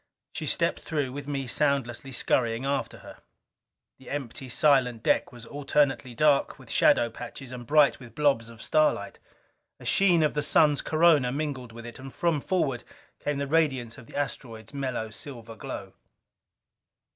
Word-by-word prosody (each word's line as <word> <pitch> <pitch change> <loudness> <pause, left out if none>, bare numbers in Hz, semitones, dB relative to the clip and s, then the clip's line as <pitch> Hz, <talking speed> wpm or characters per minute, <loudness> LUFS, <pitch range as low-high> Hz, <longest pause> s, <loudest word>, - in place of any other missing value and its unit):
She - - -4
stepped - - +1
through, 145 -5 -2
with 140 +1 -7
me 140 -2 -2
soundlessly 135 -1 0
scurrying 120 -1 +1
after 140 0 -2
her. - - -11 0.8
The 130 - -13
empty, 135 -1 -5
silent 125 -4 +3
deck - - +2
was 120 -1 -11
alternately 140 -2 0
dark 145 +1 +3
with - - -12
shadow 115 -1 +4
patches 130 +3 -9
and 120 -2 -8
bright 150 0 +4
with 120 -3 -13
blobs 140 -6 +2
of 115 -1 -11
starlight. 155 -10 +1 0.6
A - - -12
sheen 180 -5 +4
of 150 - +2
the 150 - 0
Sun's 150 0 +3
corona 155 -4 +4
was 130 - -3
mingled 135 -6 -4
with 115 +1 -10
it; 120 +2 -9
and 135 0 -9
from 165 -2 0
forward 135 -10 0 0.4
came 145 -1 -2
the 140 - -1
radiance 135 -6 0
of 115 - -14
the - - -13
asteroid's 115 -5 -5
mellow 130 -5 -3
silver 115 -1 -7
glow. - - -7
135 Hz, 165 wpm, -27 LUFS, 120-145 Hz, 0.8 s, shadow